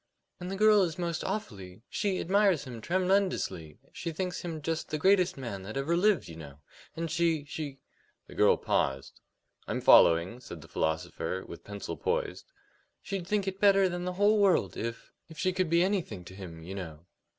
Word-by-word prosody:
"And 180 Hz, 0 st, -6 dB
the 195 Hz, -, -3 dB
girl 210 Hz, 0 st, +5 dB
is 170 Hz, -4 st, -1 dB
most 170 Hz, -2 st, -2 dB
awfully 100 Hz, -, -5 dB
she 200 Hz, -3 st, -1 dB
admires 195 Hz, -3 st, +2 dB
him 120 Hz, -5 st, -8 dB
tremendously; 185 Hz, -, 0 dB, 0.2 s
she 165 Hz, -, -4 dB
thinks 180 Hz, +3 st, -3 dB
him 165 Hz, -3 st, -5 dB
just 165 Hz, +1 st, -2 dB
the 155 Hz, -, -1 dB
greatest 185 Hz, +1 st, +3 dB
man 115 Hz, -7 st, -5 dB
that 110 Hz, +6 st, -6 dB
ever 145 Hz, +5 st, 0 dB
lived, 190 Hz, -, +2 dB
you 80 Hz, -, -9 dB
know. 70 Hz, -3 st, -10 dB, 0.4 s
And 165 Hz, -1 st, -3 dB
she 165 Hz, -3 st, +1 dB
she 145 Hz, -2 st, -6 dB, 0.3 s
" -, -, -41 dB
The -, -, -12 dB
girl -, -, +4 dB
paused. 65 Hz, 0 st, -1 dB, 0.5 s
"I'm -, -, -2 dB
following," 85 Hz, +8 st, +5 dB
said 100 Hz, -10 st, -10 dB
the -, -, -13 dB
philosopher, 80 Hz, +3 st, -2 dB
with -, -, -10 dB
pencil 100 Hz, -5 st, -6 dB
poised. -, -, -2 dB, 0.5 s
"She'd 190 Hz, -3 st, -4 dB
think 205 Hz, -1 st, 0 dB
it 190 Hz, 0 st, -4 dB
better 195 Hz, -1 st, +5 dB
than 175 Hz, 0 st, -4 dB
the 180 Hz, -, -2 dB
whole 205 Hz, +3 st, +3 dB
world 195 Hz, -3 st, +3 dB
if 115 Hz, 0 st, -5 dB, 0.2 s
if 160 Hz, -, -12 dB
she 185 Hz, +3 st, 0 dB
could 185 Hz, -2 st, 0 dB
be 170 Hz, +1 st, +4 dB
anything 175 Hz, -, -2 dB
to 95 Hz, -, -11 dB
him, 85 Hz, -4 st, -9 dB
you 90 Hz, +4 st, -7 dB
know." 85 Hz, -4 st, -8 dB
165 Hz, 190 wpm, -29 LUFS, -, 0.5 s, girl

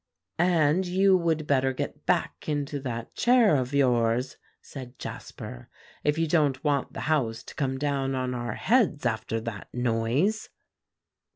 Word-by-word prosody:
"And 175 Hz, 0 st, +3 dB
you 190 Hz, +2 st, +4 dB
would 165 Hz, -3 st, +1 dB
better 135 Hz, -2 st, +2 dB
get -, -, -5 dB
back -, -, 0 dB
into 145 Hz, -1 st, -2 dB
that 120 Hz, -4 st, -5 dB
chair 240 Hz, -8 st, +4 dB
of 130 Hz, -1 st, -1 dB
yours," 125 Hz, -3 st, +2 dB, 0.2 s
said 130 Hz, -2 st, -10 dB
Jasper, -, -, -8 dB, 0.3 s
"if 150 Hz, +1 st, +1 dB
you 165 Hz, -, +2 dB
don't 145 Hz, -5 st, +2 dB
want 145 Hz, -3 st, 0 dB
the -, -, -5 dB
house 130 Hz, -8 st, 0 dB
to -, -, -11 dB
come 135 Hz, -2 st, -1 dB
down 135 Hz, -1 st, -1 dB
on 130 Hz, -1 st, -2 dB
our 120 Hz, -2 st, -3 dB
heads 210 Hz, -, +2 dB
after 115 Hz, -1 st, -1 dB
that 110 Hz, -2 st, -6 dB
noise." 125 Hz, -, 0 dB
140 Hz, 150 wpm, -27 LUFS, 125-160 Hz, 0.3 s, you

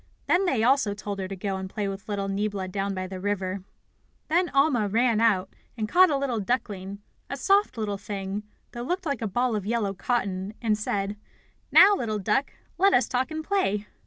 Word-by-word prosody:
Then 370 Hz, +3 st, +3 dB
they 245 Hz, -10 st, +1 dB
also 245 Hz, -5 st, +3 dB
told 205 Hz, -1 st, -5 dB
her 190 Hz, -, -3 dB
to 195 Hz, -, -5 dB
go 195 Hz, 0 st, -3 dB
and 190 Hz, 0 st, -5 dB
play 205 Hz, +1 st, -3 dB
with 195 Hz, +2 st, -6 dB
little 200 Hz, -1 st, -2 dB
Niebla 195 Hz, -1 st, -2 dB
down 195 Hz, +1 st, -2 dB
by 185 Hz, 0 st, -3 dB
the 185 Hz, 0 st, -6 dB
river. 190 Hz, -1 st, -2 dB, 0.7 s
Then 350 Hz, +2 st, +2 dB
Alma 275 Hz, -6 st, +3 dB
ran 225 Hz, +2 st, +2 dB
out, 195 Hz, -5 st, +2 dB, 0.2 s
and 215 Hz, -1 st, -1 dB
caught 365 Hz, +8 st, +6 dB
a 285 Hz, -, +1 dB
little 265 Hz, -5 st, -1 dB
duckling, 200 Hz, -3 st, -3 dB, 0.3 s
a -, -, -4 dB
soft 395 Hz, -, +2 dB
little 205 Hz, -3 st, -2 dB
thing, 195 Hz, 0 st, -4 dB, 0.3 s
that 240 Hz, 0 st, -6 dB
looked 365 Hz, +1 st, -2 dB
like 280 Hz, -4 st, -2 dB
a 225 Hz, -, -1 dB
ball 240 Hz, +3 st, 0 dB
of 210 Hz, -, -2 dB
yellow 210 Hz, -1 st, -1 dB
cotton, 195 Hz, -2 st, -2 dB
and 220 Hz, -3 st, +1 dB
said: 205 Hz, -1 st, -2 dB, 0.5 s
"Now, 405 Hz, +1 st, +8 dB
little 220 Hz, -, -2 dB
duck, 210 Hz, +7 st, 0 dB, 0.3 s
let 390 Hz, +1 st, +5 dB
us 250 Hz, -, +3 dB
talk 255 Hz, +1 st, 0 dB
and 315 Hz, 0 st, -4 dB
play." 210 Hz, -, 0 dB
210 Hz, 200 wpm, -26 LUFS, 195-255 Hz, 0.7 s, Now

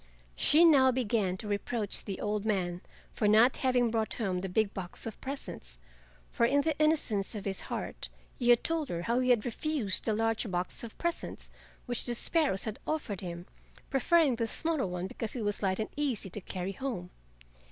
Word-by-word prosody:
She 320 Hz, -, +5 dB
now 270 Hz, -5 st, +6 dB
began 215 Hz, -7 st, 0 dB
to 210 Hz, -, -7 dB
reproach 205 Hz, +1 st, -2 dB
the 195 Hz, -, -4 dB
old 210 Hz, -1 st, -1 dB
man 180 Hz, -5 st, -1 dB, 0.3 s
for 210 Hz, -, +1 dB
not 220 Hz, +5 st, +5 dB
having 250 Hz, -3 st, +2 dB
brought 220 Hz, -1 st, 0 dB
home 190 Hz, -6 st, -1 dB
the 190 Hz, -, -4 dB
big 205 Hz, +2 st, +1 dB
box 180 Hz, -2 st, -5 dB
of 225 Hz, -, -7 dB
presents, 160 Hz, -, -7 dB, 0.5 s
for -, -, 0 dB
in 275 Hz, +5 st, +4 dB
the 315 Hz, +1 st, 0 dB
innocence 270 Hz, -10 st, +2 dB
of 205 Hz, -, -6 dB
his 195 Hz, -1 st, -2 dB
heart -, -, -4 dB, 0.3 s
he 245 Hz, -2 st, +1 dB
had 240 Hz, -1 st, +6 dB
told 325 Hz, -4 st, +1 dB
her 170 Hz, 0 st, -3 dB
how 235 Hz, +5 st, +1 dB
he 255 Hz, 0 st, +1 dB
had 235 Hz, -4 st, +4 dB
refused 245 Hz, -, 0 dB
the 220 Hz, -, +1 dB
large 225 Hz, 0 st, 0 dB
box 180 Hz, +4 st, -1 dB
of 230 Hz, -, -8 dB
presents 340 Hz, -1 st, -4 dB, 0.3 s
which 245 Hz, -2 st, 0 dB
the 240 Hz, -, 0 dB
sparrows 285 Hz, -, +2 dB
had 220 Hz, -1 st, -4 dB
offered 250 Hz, -, -2 dB
him, 175 Hz, -1 st, -6 dB, 0.5 s
preferring 280 Hz, -1 st, +3 dB
the 230 Hz, -1 st, 0 dB
smaller 315 Hz, -, -1 dB
one 180 Hz, 0 st, -3 dB
because 215 Hz, +4 st, -5 dB
it 240 Hz, -, -3 dB
was 205 Hz, -1 st, -2 dB
light 190 Hz, -2 st, +1 dB
and 220 Hz, -, -2 dB
easy 260 Hz, -10 st, -1 dB
to 210 Hz, -, -6 dB
carry 185 Hz, +1 st, -4 dB
home. 195 Hz, -5 st, -5 dB
225 Hz, 195 wpm, -30 LUFS, 195-260 Hz, 0.5 s, now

